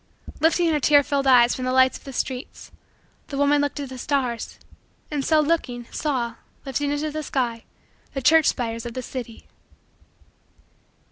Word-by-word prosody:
Lifting 330 Hz, +3 st, +3 dB
her 300 Hz, -, +1 dB
tear 290 Hz, +1 st, +5 dB
filled 280 Hz, -1 st, -1 dB
eyes 245 Hz, -2 st, +6 dB
from 255 Hz, -, -5 dB
the 255 Hz, -, 0 dB
lights 260 Hz, 0 st, +4 dB
of -, -, -11 dB
the 275 Hz, -, -7 dB
streets 260 Hz, 0 st, -5 dB, 0.6 s
the 275 Hz, -, -5 dB
woman 285 Hz, +1 st, +3 dB
looked 290 Hz, +1 st, -2 dB
at 280 Hz, -2 st, -5 dB
the 260 Hz, -1 st, -8 dB
stars, 250 Hz, -4 st, -2 dB, 0.5 s
and, 290 Hz, -2 st, -1 dB
so 315 Hz, +1 st, +3 dB
looking, 285 Hz, -6 st, -1 dB
saw, 240 Hz, -6 st, -2 dB, 0.3 s
lifting 280 Hz, +2 st, -1 dB
into 295 Hz, +1 st, -2 dB
the 310 Hz, +1 st, -4 dB
sky, 245 Hz, -6 st, -2 dB, 0.5 s
the 270 Hz, -, -2 dB
church 315 Hz, +2 st, +5 dB
spires 230 Hz, -1 st, -2 dB
of 235 Hz, -, -8 dB
the 255 Hz, -, -4 dB
city. 240 Hz, -3 st, -7 dB
270 Hz, 165 wpm, -23 LUFS, 245-290 Hz, 0.6 s, eyes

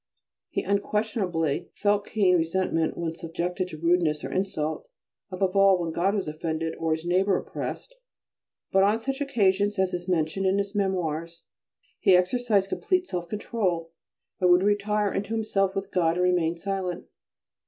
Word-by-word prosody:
He -, -, -2 dB
unquestionably 200 Hz, -6 st, -1 dB
felt 205 Hz, 0 st, +1 dB
keen 195 Hz, -4 st, +3 dB
resentment 165 Hz, -1 st, 0 dB
when 165 Hz, -1 st, -2 dB
subjected 175 Hz, +3 st, -3 dB
to 160 Hz, -, -9 dB
rudeness 165 Hz, -2 st, +1 dB
or -, -, -5 dB
insult, 185 Hz, -, -2 dB, 0.4 s
above 185 Hz, 0 st, -1 dB
all 195 Hz, -1 st, +6 dB
when 170 Hz, -2 st, -3 dB
God 190 Hz, +5 st, +1 dB
was 195 Hz, -5 st, -2 dB
offended, 160 Hz, +1 st, -3 dB
or 160 Hz, -1 st, +1 dB
his 160 Hz, +1 st, -4 dB
neighbour 185 Hz, +2 st, +2 dB
oppressed; -, -, -6 dB, 0.8 s
but 190 Hz, -, +4 dB
on 205 Hz, +3 st, +4 dB
such 270 Hz, +4 st, -4 dB
occasions, 205 Hz, -6 st, +2 dB
as 190 Hz, -1 st, +1 dB
is 175 Hz, 0 st, -4 dB
mentioned 180 Hz, +2 st, 0 dB
in 190 Hz, +1 st, +2 dB
his 200 Hz, 0 st, -2 dB
memoirs, 170 Hz, -4 st, -2 dB, 0.6 s
he 190 Hz, -, +5 dB
exercised 200 Hz, +1 st, +1 dB
complete 365 Hz, -, 0 dB
self 175 Hz, -, -4 dB
control 185 Hz, -6 st, -2 dB, 0.5 s
and 180 Hz, -2 st, +3 dB
would 180 Hz, +1 st, +5 dB
retire 205 Hz, 0 st, +1 dB
into 205 Hz, +3 st, -2 dB
himself 195 Hz, -3 st, 0 dB
with 195 Hz, 0 st, -4 dB
God 165 Hz, -2 st, +2 dB
and 180 Hz, -, +1 dB
remain 175 Hz, -2 st, +2 dB
silent. 185 Hz, 0 st, -3 dB
185 Hz, 155 wpm, -26 LUFS, 170-200 Hz, 0.8 s, all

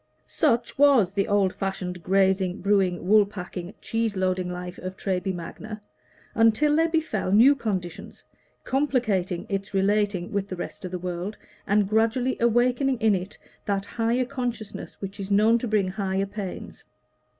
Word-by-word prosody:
Such 245 Hz, -4 st, 0 dB
was 270 Hz, -10 st, +5 dB
the 200 Hz, +1 st, 0 dB
old 200 Hz, -3 st, +2 dB
fashioned, 185 Hz, -2 st, -4 dB
grazing, 190 Hz, +1 st, +2 dB
brewing, 190 Hz, -3 st, +1 dB
wool 210 Hz, +1 st, +6 dB
packing, 180 Hz, -2 st, -7 dB
cheese 225 Hz, -3 st, -1 dB
loading 185 Hz, -1 st, 0 dB
life 180 Hz, 0 st, -6 dB
of 185 Hz, +1 st, -6 dB
Treby 190 Hz, -1 st, -1 dB
Magna, 210 Hz, +5 st, -7 dB, 0.5 s
until 230 Hz, +7 st, +3 dB
there 325 Hz, +1 st, +3 dB
befell 315 Hz, -, -1 dB
new 235 Hz, +8 st, +7 dB
conditions, 195 Hz, -7 st, -5 dB, 0.4 s
complicating 220 Hz, -10 st, 0 dB
its 195 Hz, -1 st, -4 dB
relation 200 Hz, -2 st, +1 dB
with 200 Hz, -1 st, -1 dB
the 185 Hz, -, -5 dB
rest 175 Hz, -, -7 dB
of -, -, -4 dB
the 180 Hz, -, -4 dB
world, 180 Hz, +3 st, -4 dB, 0.3 s
and 205 Hz, -1 st, +3 dB
gradually 225 Hz, +4 st, +1 dB
awakening 245 Hz, +3 st, +2 dB
in 220 Hz, -2 st, +3 dB
it 190 Hz, +1 st, -4 dB, 0.3 s
that 200 Hz, -1 st, -1 dB
higher 235 Hz, +4 st, 0 dB
consciousness 245 Hz, -5 st, -5 dB
which 195 Hz, 0 st, -6 dB
is 195 Hz, 0 st, -5 dB
known 215 Hz, +3 st, +4 dB
to 245 Hz, -, -3 dB
bring 210 Hz, -4 st, +1 dB
higher 195 Hz, 0 st, -1 dB
pains. 200 Hz, -2 st, -7 dB
200 Hz, 150 wpm, -25 LUFS, 185-230 Hz, 0.5 s, new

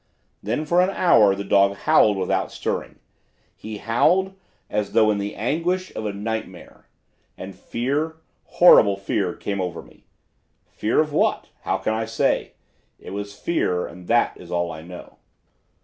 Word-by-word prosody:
"Then 120 Hz, +9 st, -2 dB
for 175 Hz, +3 st, +3 dB
an 185 Hz, -, +2 dB
hour 110 Hz, -, +4 dB
the 100 Hz, -, -5 dB
dog 100 Hz, 0 st, +3 dB
howled 105 Hz, +1 st, +3 dB
without 95 Hz, -1 st, -1 dB
stirring; -, -, -4 dB, 0.6 s
he 110 Hz, 0 st, -8 dB
howled 175 Hz, -, +1 dB, 0.3 s
as 105 Hz, -1 st, -3 dB
though 110 Hz, -1 st, +4 dB
in 105 Hz, -, -1 dB
the 100 Hz, +1 st, -4 dB
anguish 170 Hz, +9 st, -2 dB
of 110 Hz, -, -3 dB
a -, -, -2 dB
nightmare; 100 Hz, -3 st, -6 dB, 0.5 s
and 95 Hz, +1 st, -8 dB
fear, 140 Hz, -, -3 dB, 0.3 s
horrible 105 Hz, -, +6 dB
fear 95 Hz, -2 st, -2 dB
came 100 Hz, -2 st, -4 dB
over 90 Hz, -2 st, -4 dB
me. -, -, -22 dB, 0.6 s
Fear 110 Hz, +7 st, 0 dB
of 150 Hz, -1 st, -3 dB
what? -, -, 0 dB, 0.2 s
How -, -, 0 dB
can 110 Hz, -, -2 dB
I 110 Hz, 0 st, -2 dB
say? 115 Hz, 0 st, -1 dB, 0.4 s
It -, -, -11 dB
was 100 Hz, +1 st, -6 dB
fear, 90 Hz, -, -1 dB
and 90 Hz, 0 st, -12 dB
that 120 Hz, +1 st, +2 dB
is 90 Hz, -, -13 dB
all 85 Hz, -1 st, -1 dB
I 80 Hz, -, -8 dB
know. 90 Hz, +2 st, -12 dB
105 Hz, 160 wpm, -22 LUFS, 100-140 Hz, 0.6 s, horrible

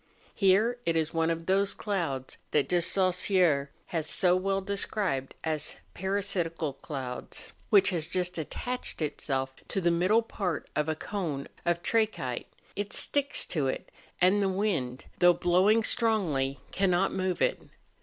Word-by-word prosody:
Here 215 Hz, +5 st, +3 dB
it 165 Hz, -1 st, +1 dB
is 160 Hz, 0 st, -1 dB
one 165 Hz, 0 st, +1 dB
of 165 Hz, 0 st, -2 dB
those 195 Hz, +2 st, +2 dB
clouds 165 Hz, -, -3 dB
that 150 Hz, +2 st, +1 dB
He 175 Hz, -1 st, +3 dB
Saussure 180 Hz, -5 st, +2 dB, 0.2 s
has 160 Hz, -2 st, +1 dB
so 180 Hz, -2 st, +4 dB
well 195 Hz, +1 st, 0 dB
described 195 Hz, -7 st, -2 dB
as 155 Hz, -2 st, -2 dB, 0.2 s
parasitical 180 Hz, -5 st, -1 dB
clouds, 130 Hz, -3 st, -6 dB, 0.2 s
which 200 Hz, -2 st, +5 dB
has 165 Hz, -3 st, -1 dB
just 180 Hz, -1 st, -1 dB
attached 245 Hz, -, -4 dB
itself 135 Hz, -3 st, -2 dB
to -, -, -1 dB
the 175 Hz, -2 st, +2 dB
middle 185 Hz, +7 st, +3 dB
part 185 Hz, -7 st, -3 dB
of 150 Hz, +1 st, 0 dB
a 160 Hz, -, 0 dB
cone 160 Hz, -5 st, -4 dB, 0.2 s
of 170 Hz, 0 st, +1 dB
trachyte: 215 Hz, -, 0 dB, 0.3 s
it 205 Hz, 0 st, -3 dB
sticks 280 Hz, -1 st, +3 dB
to 150 Hz, -6 st, 0 dB
it; 130 Hz, -, -4 dB, 0.3 s
and 185 Hz, +3 st, +4 dB
the 195 Hz, -, +2 dB
wind, 185 Hz, -11 st, -1 dB
though 175 Hz, 0 st, +7 dB
blowing 185 Hz, +6 st, +3 dB
strongly, 175 Hz, -, +1 dB
cannot 190 Hz, -1 st, +2 dB
move 185 Hz, -1 st, -1 dB
it. -, -, +1 dB
180 Hz, 145 wpm, -29 LUFS, 155-200 Hz, 0.3 s, though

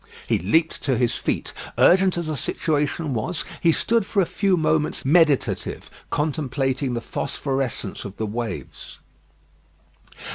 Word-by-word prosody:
He -, -, +2 dB
leaped 155 Hz, -, +1 dB
to 130 Hz, -4 st, 0 dB
his 120 Hz, -1 st, +1 dB
feet. -, -, -2 dB, 0.2 s
Urgent 185 Hz, 0 st, +5 dB
as 170 Hz, -, -2 dB
the 155 Hz, -1 st, -2 dB
situation 150 Hz, +2 st, -1 dB
was, 125 Hz, +9 st, -2 dB, 0.2 s
he 170 Hz, -, +5 dB
stood 230 Hz, +7 st, +2 dB
for 200 Hz, -, -1 dB
a 190 Hz, -, +4 dB
few 195 Hz, +1 st, +1 dB
moments 155 Hz, -3 st, +1 dB
meditative, 150 Hz, -1 st, +2 dB, 0.2 s
contemplating 135 Hz, -3 st, -1 dB
the 115 Hz, -, -2 dB
phosphorescence 135 Hz, 0 st, -3 dB
of 100 Hz, -1 st, -8 dB
the 110 Hz, -, -2 dB
waves. 115 Hz, +2 st, -5 dB
150 Hz, 135 wpm, -23 LUFS, 130-165 Hz, 0.2 s, Urgent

